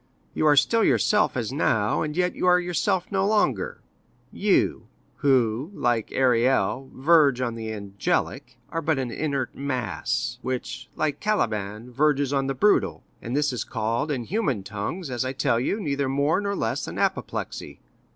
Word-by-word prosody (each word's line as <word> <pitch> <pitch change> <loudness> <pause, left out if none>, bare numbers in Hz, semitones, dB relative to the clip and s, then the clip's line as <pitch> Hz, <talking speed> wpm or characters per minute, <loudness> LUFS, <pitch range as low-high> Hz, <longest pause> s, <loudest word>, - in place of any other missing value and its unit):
You 155 - +1
are 145 - +6
still 225 +11 +4
yourself 210 -9 +3
as 120 +1 -2
now, 110 -7 +1
and 150 0 -3
yet 180 0 +1
you - - -1
are 180 0 +6
yourself 180 +2 -1
no 190 -1 +1
longer; 195 - +1 0.5
you - - +1 0.3
who, 130 0 +2
like 120 -3 0
Ariel, 130 +1 +2
verge 140 -2 +4
on 125 -2 -1
the 110 -1 -5
angelic, 100 -2 -2
are 165 - -2
but 160 -1 +1
an 130 -3 -2
inert 140 -3 -2
mass, 125 -2 -2
which, 130 -1 -4
like 155 -2 -1
Caliban, 110 - -1
verges 145 +1 +1
on 135 -1 +1
the 135 - -2
brutal; 205 +11 +2 0.2
and 120 +3 -4
this 145 -2 +1
is 125 - -2
called 115 +5 -2
in 130 -5 -1
human 145 - -1
tongues, 110 - -5
as 125 0 -1
I 130 +1 -3
tell 115 -3 +1
you, 165 - -1
neither 140 -7 -1
more 145 +7 +1
nor 200 0 -2
less - - -2
than - - -7
apoplexy. - - -3
135 Hz, 165 wpm, -25 LUFS, 120-155 Hz, 0.5 s, are